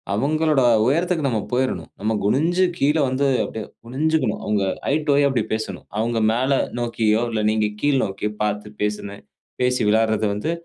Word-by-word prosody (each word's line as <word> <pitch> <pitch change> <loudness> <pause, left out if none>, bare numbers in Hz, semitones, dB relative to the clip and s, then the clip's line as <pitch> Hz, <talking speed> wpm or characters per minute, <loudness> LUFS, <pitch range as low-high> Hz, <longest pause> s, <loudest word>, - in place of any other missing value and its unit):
அவுங்களோட 150 +4 +1 0.2
உயரத்துக்கு 165 +3 +1
நம்ம 115 -3 0
போயிரணும். 130 +1 -1
நம்ம 110 +2 0
குனிஞ்சு 165 - +2
கீழ 145 +2 +2
வந்து 130 +2 0 0.2
அப்டியே 110 -2 -6 0.2
குனிஞ்சிக்கணும். 140 -2 0
அவுங்க 105 -2 0 0.3
ஐ - - +2
டூ 145 - +4
ஐ - - +4
அப்டி 125 -5 0
பேசணும். 110 -4 -5
அவுங்க 115 0 0
மேல 130 +4 +1 0.3
நோக்கியோ! 115 -1 +1
இல்ல 110 -1 -1
நீங்க 110 -1 +1
கீழ் 145 -2 +2
நோக்கியோ! 100 +1 -3
பார்த்து 105 0 -3
பேசுன 105 -1 -3 0.4
பேசி 125 0 +1
விளையாட்றது 110 0 +2
வந்து 105 +10 -2
115 Hz, 160 wpm, -22 LUFS, 105-140 Hz, 0.4 s, டூ